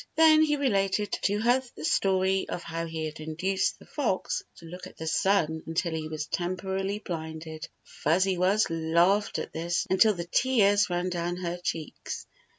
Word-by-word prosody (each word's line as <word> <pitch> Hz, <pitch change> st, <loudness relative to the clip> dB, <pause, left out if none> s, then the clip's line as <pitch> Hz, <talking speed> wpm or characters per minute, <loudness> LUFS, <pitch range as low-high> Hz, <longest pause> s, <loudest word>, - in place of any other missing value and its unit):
Then 315 Hz, 0 st, +7 dB
he 300 Hz, -1 st, +3 dB
related 205 Hz, -7 st, +1 dB
to 205 Hz, +1 st, +1 dB
her 245 Hz, +3 st, +3 dB
the 150 Hz, -, -6 dB
story 190 Hz, +1 st, +2 dB
of 175 Hz, -, -4 dB
how 165 Hz, 0 st, -4 dB
he 160 Hz, -1 st, -4 dB
had 155 Hz, 0 st, -6 dB
induced 185 Hz, +5 st, -1 dB
the -, -, -16 dB
fox 235 Hz, -11 st, -1 dB
to 170 Hz, -, -14 dB
look 180 Hz, +2 st, -8 dB
at -, -, -16 dB
the 160 Hz, -, -6 dB
sun 160 Hz, -2 st, +1 dB
until 165 Hz, +1 st, -1 dB
he 160 Hz, -1 st, -3 dB
was 155 Hz, -1 st, -4 dB
temporarily 190 Hz, +3 st, -2 dB
blinded. 160 Hz, -4 st, -6 dB, 0.2 s
Fuzzy 185 Hz, +5 st, +1 dB
Wuzz 190 Hz, +4 st, +3 dB
laughed 170 Hz, +5 st, +2 dB
at -, -, -5 dB
this 170 Hz, +2 st, -1 dB
until 200 Hz, +3 st, +5 dB
the 170 Hz, -1 st, -4 dB
tears 205 Hz, -1 st, +3 dB
ran 175 Hz, +1 st, -1 dB
down 175 Hz, 0 st, -2 dB
her 175 Hz, -1 st, -3 dB
cheeks. 160 Hz, -3 st, -4 dB
180 Hz, 170 wpm, -28 LUFS, 165-200 Hz, 0.2 s, Then